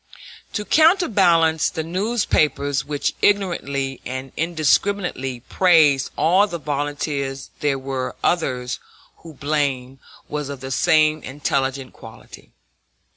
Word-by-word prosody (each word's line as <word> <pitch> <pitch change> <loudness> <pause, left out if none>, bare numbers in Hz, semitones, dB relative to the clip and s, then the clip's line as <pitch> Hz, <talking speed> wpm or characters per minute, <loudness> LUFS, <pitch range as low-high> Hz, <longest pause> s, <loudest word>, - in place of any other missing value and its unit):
[*] - - -15
[*] - - -32
To 210 - -3
counterbalance 195 - +4
the 160 -3 -4
newspapers 160 - 0
which 145 -1 -2
ignorantly 140 -9 0
and 130 +1 -6
indiscriminately 160 -4 0
praised 155 -4 +3
all 185 +5 +4
the 175 - -5
volunteers 145 -2 -3
there 145 -2 0
were 130 -1 -4
others 125 -7 -1 0.4
whose 165 -2 -13
blame 135 -3 -2 0.3
was 150 -2 -4
of 140 -2 -6
the 130 0 -7
same 155 +1 +3
intelligent 135 -1 -2
quality. 110 -1 -14
145 Hz, 115 wpm, -21 LUFS, 135-170 Hz, 0.4 s, counterbalance